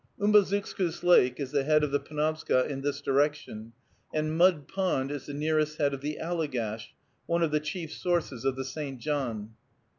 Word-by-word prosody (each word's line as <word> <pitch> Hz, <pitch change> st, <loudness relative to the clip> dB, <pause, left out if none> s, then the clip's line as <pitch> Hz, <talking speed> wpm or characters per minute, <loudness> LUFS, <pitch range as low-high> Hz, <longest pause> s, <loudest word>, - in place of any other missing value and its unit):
Umbazookskus 200 Hz, -4 st, +2 dB
Lake 130 Hz, -8 st, +5 dB
is 140 Hz, -2 st, -4 dB
the 140 Hz, -2 st, +1 dB
head 150 Hz, +1 st, +3 dB
of 150 Hz, -, 0 dB
the 145 Hz, -, +2 dB
Penobscot 155 Hz, -3 st, 0 dB
in 135 Hz, -1 st, -4 dB
this 140 Hz, 0 st, -2 dB
direction, 140 Hz, -6 st, 0 dB, 0.4 s
and 155 Hz, 0 st, -1 dB
Mud 170 Hz, -5 st, +4 dB
Pond 180 Hz, -8 st, -1 dB
is 145 Hz, -2 st, -6 dB
the 145 Hz, -, -5 dB
nearest 155 Hz, 0 st, 0 dB
head 140 Hz, -2 st, +1 dB
of 135 Hz, -, -5 dB
the 150 Hz, +1 st, -3 dB
Allegash, 125 Hz, -10 st, -3 dB, 0.3 s
one 170 Hz, 0 st, +1 dB
of 160 Hz, -, +1 dB
the 150 Hz, -, +2 dB
chief 160 Hz, +1 st, -5 dB
sources 170 Hz, -9 st, -1 dB
of 135 Hz, -1 st, +1 dB
the 135 Hz, 0 st, -4 dB
St. 135 Hz, -1 st, -5 dB
John. 120 Hz, -7 st, -3 dB
150 Hz, 180 wpm, -28 LUFS, 135-160 Hz, 0.4 s, Lake